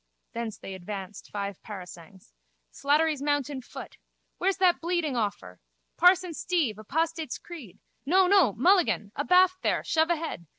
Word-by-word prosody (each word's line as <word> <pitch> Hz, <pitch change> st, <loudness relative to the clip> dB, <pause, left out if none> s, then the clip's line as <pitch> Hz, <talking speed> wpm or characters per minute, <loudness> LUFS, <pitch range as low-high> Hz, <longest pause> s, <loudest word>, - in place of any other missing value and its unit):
Thence 230 Hz, -2 st, -4 dB
they 195 Hz, -, -8 dB
advanced 190 Hz, +1 st, -8 dB
five 200 Hz, -2 st, -5 dB
parasangs. 185 Hz, -3 st, -11 dB, 0.4 s
Slattery's 300 Hz, +1 st, +1 dB
mounted 285 Hz, -2 st, -1 dB
foot. -, -, -10 dB, 0.4 s
Where's 385 Hz, +1 st, +1 dB
that 370 Hz, -2 st, +3 dB
bleeding 340 Hz, -4 st, -1 dB
awfur? 200 Hz, -, -3 dB, 0.4 s
Parson 360 Hz, 0 st, +4 dB
Steve, 310 Hz, -, -1 dB
apostates' 320 Hz, +5 st, -2 dB
creed! 275 Hz, -, -11 dB, 0.3 s
No, 370 Hz, +7 st, +4 dB
no, 370 Hz, -, +5 dB
Mulligan! 310 Hz, -, +2 dB
Abaft 365 Hz, +5 st, +3 dB
there! -, -, 0 dB
Shove 320 Hz, 0 st, +1 dB
ahead. 320 Hz, -, -3 dB
290 Hz, 130 wpm, -27 LUFS, 210-345 Hz, 0.4 s, no